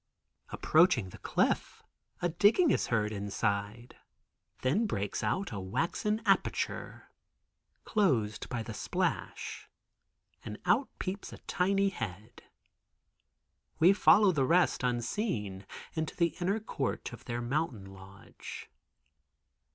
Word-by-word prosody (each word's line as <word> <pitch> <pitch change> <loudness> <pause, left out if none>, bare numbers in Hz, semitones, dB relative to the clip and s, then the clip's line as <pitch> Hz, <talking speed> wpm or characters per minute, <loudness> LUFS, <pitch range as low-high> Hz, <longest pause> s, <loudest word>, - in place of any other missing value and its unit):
Approaching 155 - +3
the - - -12
cliff - - 0 0.4
a 175 - +3
digging 215 - +4
is - - +1
heard 110 -2 +1
inside. 100 +2 -3 0.7
Then 195 - +2
breaks 100 - -2
out 190 - -1
a 100 - -4
waxen 170 - -1
aperture, 195 -2 0 0.7
(closed 125 - +1
by 120 -3 -3
the 110 - -7
splash) - - -3 0.7
and 105 - -6
out 215 +10 +3
peeps 195 +2 -4
a - - -9
tiny 195 +2 +2
head. 110 - -7 1.4
We 175 +5 +6
follow 205 0 +6
the 145 -6 +1
rest, 175 +6 +3
unseen, 120 - -2 0.3
into 160 -1 -3
the 170 -2 +1
inner 195 +5 +1
court 145 - -3
of - - -11
their 120 -1 -3
mountain 120 -4 -2
lodge. 95 0 -11
130 Hz, 110 wpm, -31 LUFS, -, 1.4 s, We